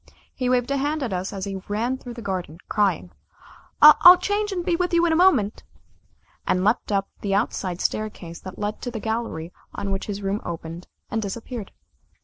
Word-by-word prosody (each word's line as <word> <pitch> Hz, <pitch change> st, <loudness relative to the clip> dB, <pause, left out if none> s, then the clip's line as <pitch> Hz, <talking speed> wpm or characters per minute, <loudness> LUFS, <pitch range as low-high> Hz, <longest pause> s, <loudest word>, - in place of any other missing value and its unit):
He 255 Hz, -2 st, -2 dB
waved 250 Hz, +1 st, +1 dB
a 280 Hz, -, +1 dB
hand 290 Hz, +2 st, -1 dB
at 230 Hz, -7 st, -2 dB
us 185 Hz, +1 st, -3 dB
as 195 Hz, -1 st, -4 dB
he 195 Hz, -1 st, -5 dB
ran 230 Hz, +5 st, -1 dB
through 245 Hz, -3 st, -9 dB
the 235 Hz, -, -8 dB
garden 180 Hz, -5 st, -4 dB
crying: 195 Hz, -4 st, 0 dB, 0.7 s
"I'll 350 Hz, +4 st, +10 dB
change, 410 Hz, +3 st, -1 dB
and 355 Hz, -3 st, -3 dB
be 350 Hz, -, +2 dB
with 355 Hz, 0 st, 0 dB
you 340 Hz, 0 st, +4 dB
in 330 Hz, -, +2 dB
a -, -, +3 dB
moment," 325 Hz, -, +3 dB, 0.8 s
and 185 Hz, -, +2 dB
leapt 215 Hz, +2 st, +1 dB
up 195 Hz, -1 st, +1 dB
the 195 Hz, -1 st, 0 dB
outside 190 Hz, -4 st, -1 dB
staircase 190 Hz, -6 st, -3 dB
that 185 Hz, -1 st, -9 dB
led 210 Hz, +1 st, -3 dB
to 245 Hz, -, -3 dB
the 235 Hz, -2 st, -5 dB
gallery 220 Hz, -7 st, -3 dB, 0.2 s
on 200 Hz, -, -3 dB
which 195 Hz, -, -3 dB
his 205 Hz, -1 st, -4 dB
room 195 Hz, +2 st, -1 dB
opened, 165 Hz, 0 st, -7 dB, 0.2 s
and 225 Hz, -, 0 dB
disappeared. 220 Hz, +2 st, -6 dB
215 Hz, 195 wpm, -24 LUFS, 195-260 Hz, 0.8 s, I'll